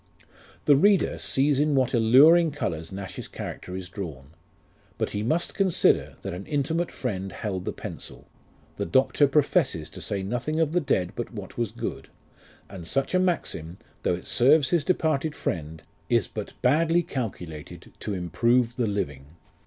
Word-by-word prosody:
The 145 - +6
reader 195 +5 +3
sees 140 +1 +2
in 150 0 +2
what 130 -1 +2
alluring 140 +9 +6
colours 85 - -3
Nash's 95 0 -6
character 90 - -7
is 95 -1 -5
drawn; 80 -8 -7 0.7
but - - -1
he 105 - -2
must 160 +11 0
consider, 190 -4 +2
that 95 - -4
an 90 +3 -7
intimate 160 +4 -1
friend 95 -6 -4
held 95 0 -4
the - - -1
pencil; - - -8 0.5
the - - -2
Doctor 130 - +3
pro 145 +2 +4
fesses 135 - 0
to - - -7
say 100 -2 -1
nothing 125 +10 -2
of 160 -2 +2
the 180 - +2
dead 90 - 0
but 120 - -4
what 105 -5 -8
was 120 -3 -1
good; - - -5 0.6
and 90 -4 -9
such 135 - 0
a 185 - +4
maxim, 95 - -1 0.2
though 90 - +1
it 90 - -10
serves 140 +4 +4
his 170 -4 +3
departed 155 -3 0
friend, 80 -2 -4 0.3
is 120 -3 +3
but 105 -2 -7
badly 165 +6 +3
calculated 85 - -6
to 105 - -3
improve 115 +8 +1
the 120 -3 +1
living. 70 -10 -3
120 Hz, 165 wpm, -26 LUFS, 95-150 Hz, 0.7 s, The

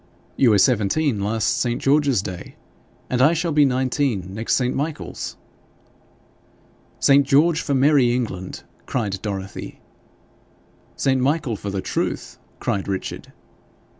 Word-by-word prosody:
'You 130 - +4
were 105 - +5
seventeen 120 +3 +2
last 110 +2 0
St. 120 -1 -1
George's 140 -6 +2
Day, 95 -4 -7 0.5
and 125 0 0
I 150 +5 +5
shall 170 0 -1
be 150 -1 +5
nineteen 130 -7 -1
next 110 +3 0
St. 125 -1 0
Michael's.' 150 +2 -4 1.6
'St. 140 0 +5
George 150 +4 +3
for 140 - -1
merry 135 -2 +4
England!' 110 -7 -4 0.2
cried 100 -6 -2
Dorothy. 100 -2 -6 1.2
'St. 130 -1 +1
Michael 140 -3 0
for 100 - -6
the 100 -1 -3
Truth!' - - -3 0.2
cried 100 - -2
Richard. 95 -1 -5
125 Hz, 125 wpm, -22 LUFS, 105-140 Hz, 1.6 s, were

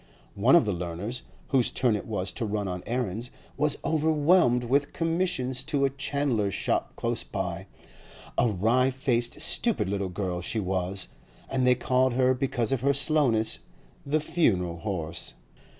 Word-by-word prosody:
One - - +4
of - - +5
the 105 - 0
learners, 90 +8 -4 0.3
whose 130 -3 +2
turn 120 -4 +1
it 105 - -5
was 100 -4 -2
to 120 - -5
run 105 -2 -2
on 90 -1 -4
errands, 120 -1 -2 0.3
was 150 -1 +1
overwhelmed 155 -4 +3
with 140 +4 +1
commissions 165 -7 -1
to 140 -2 +1
a 135 - 0
chandler's 140 -7 -1
shop - - -1
close - - -2
by; - - -4 0.7
a 120 - +3
wry 115 +6 +2
faced, 125 -3 -1
stupid 225 - +2
little 100 -1 -2
girl 90 -1 -3
she 110 +5 -1
was, 95 0 -1 0.4
and 130 -1 0
they 125 - +6
called 130 0 +1
her, 130 +1 +3
because 125 -3 -1
of 135 -3 0
her 140 +1 +2
slowness, 130 -8 +2 0.4
the 150 +2 +1
'funeral 95 - +1
horse. 85 -4 -4
125 Hz, 155 wpm, -27 LUFS, 100-140 Hz, 0.7 s, they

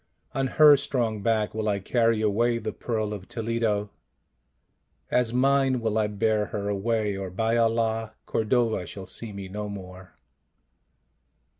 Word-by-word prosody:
On 135 0 0
her 150 +2 +7
strong 120 -6 -1
back 110 -1 +1
will 110 0 -1
I 100 - +1
carry 115 +2 +1
away 115 +3 +2
the 110 -2 -4
Pearl 110 -3 -2
of 95 -2 -8
Toledo, 110 -3 -1 1.2
as 125 -2 +2
mine 135 +1 +3
will 110 -2 -1
I 110 -1 +2
bear 105 +1 +1
her 100 0 -3
away, 105 0 0
or 95 -1 -4
by 110 +5 0
Allah, 115 -1 +1
Cordova 110 -4 0
shall 95 +2 -8
see 105 +4 -7
me 100 -1 -7
no 105 +2 -5
more." 95 -2 -10
110 Hz, 145 wpm, -26 LUFS, 105-115 Hz, 1.2 s, her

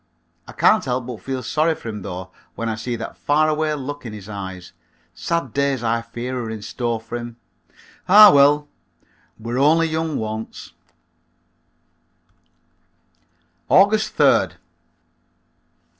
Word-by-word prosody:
I - - -9
can't - - +3
help 125 -1 -2
but 120 -3 -8
feel 130 -1 -4
sorry 155 +5 +1
for 115 - -8
him 105 -2 -6
though 90 0 -7 0.2
when 115 0 -3
I - - -1
see 115 +2 -4
that 115 0 -7
far 155 +2 +2
away 155 0 0
look 145 +1 -6
in 115 -3 -7
his 105 -2 -10
eyes. 95 -3 -8 0.4
Sad 170 -8 -3
days 140 -3 0
I 115 0 0
fear 120 +2 -5
are 115 - -5
in 110 -2 -6
store 120 +1 -3
for 115 +2 -6
him. 120 0 -8 0.7
Ah, 210 +1 +10
well, 145 +1 +4 0.7
we're 115 +3 -4
only 160 +4 +4
young 160 -1 -2
once. 110 -3 -6 3.0
_August 215 +3 +4
3d. - - +4
125 Hz, 135 wpm, -21 LUFS, 110-150 Hz, 3.0 s, Ah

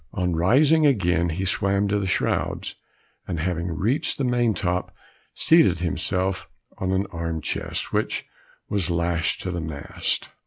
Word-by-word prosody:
On 90 -3 0
rising 140 - +4
again 90 - +2
he 90 +4 -2
swam 100 +1 +1
to 105 +1 +1
the 100 - -2
shrouds, 95 - -1 0.5
and 85 -3 -3
having 85 +1 -1
reached 100 - 0
the 140 - -1
main 120 -3 +2
top, 90 0 -1 0.4
seated 160 - +5
himself 95 +2 -1 0.3
on 95 0 -1
an 95 +1 +1
arm 85 -1 -3
chest - - -3
which - - -1 0.4
was 100 -5 0
lashed 85 -1 0
to 90 - -3
the 85 -1 -3
mast. 80 -3 -3
90 Hz, 150 wpm, -24 LUFS, 85-100 Hz, 0.5 s, seated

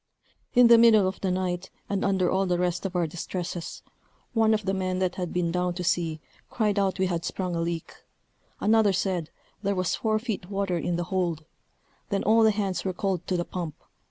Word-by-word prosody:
In 245 0 +8
the 235 0 +8
middle 220 -4 +6
of 190 - -4
the 190 - 0
night, 180 0 -2 0.2
and 200 -1 -1
under 190 -2 +2
all 190 0 +1
the 180 -1 +1
rest 180 +2 -1
of 185 - -11
our 175 -1 +2
distresses, 175 +1 -5 0.5
one 225 -1 +3
of 215 -2 -4
the 195 - 0
men 185 -1 -1
that 185 -1 0
had 180 -2 -4
been 175 -1 0
down 180 0 -1
to 180 - -4
see, 165 -2 0 0.3
cried 210 -3 +1
out 195 -1 +1
we 190 - +2
had 170 -2 -2
sprung 180 -1 -3
a 165 - -1
leak; 170 0 -3 0.7
another 215 -2 +4
said, 180 -4 -1 0.3
there 200 -1 0
was 185 -2 0
four 215 -1 +1
feet 215 -5 -4
water 195 -3 -1
in 175 +2 -1
the 175 - -1
hold. 170 -4 -1 0.6
Then 200 -1 0
all 225 +2 +5
hands 205 -3 +1
were 190 - -2
called 185 -2 -2
to 185 - 0
the 175 - -1
pump. 170 -5 -5
185 Hz, 210 wpm, -26 LUFS, 175-200 Hz, 0.7 s, In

